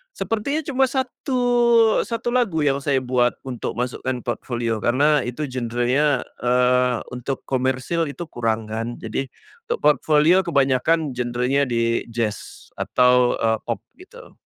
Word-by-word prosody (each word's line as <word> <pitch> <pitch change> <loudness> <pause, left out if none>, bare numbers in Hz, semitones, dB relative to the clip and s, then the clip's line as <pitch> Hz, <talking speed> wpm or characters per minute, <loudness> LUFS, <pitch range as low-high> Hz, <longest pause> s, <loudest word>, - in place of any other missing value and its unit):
sepertinya 280 +8 -2
cuma 270 -2 +2
satu 260 0 -2 0.6
satu 230 0 -3
lagu 225 -11 +1
yang 140 -1 +2
saya 140 -2 0
buat 125 -1 +1
untuk 125 -3 -5
masukkan 125 +1 -2
portfolio, 120 -1 -2
karena 145 +6 +3
itu 125 +5 -4
genrenya, 125 +3 0 0.2
eee, 125 0 +2
untuk 125 +2 -4
komersil 130 +5 -1
itu 160 +5 -6
kurang 115 -3 -1
kan. 115 +2 -4
Jadi, 135 - -3 0.4
untuk 475 - -2
portfolio 150 +3 +4
kebanyakan 145 +1 +1
genrenya 125 +3 0
di 115 -1 0
jazz 115 -2 -5
atau, 125 -1 +3
eee, 110 0 +1
pop - - -2 0.2
gitu. - - -15
130 Hz, 130 wpm, -22 LUFS, 120-155 Hz, 0.6 s, portfolio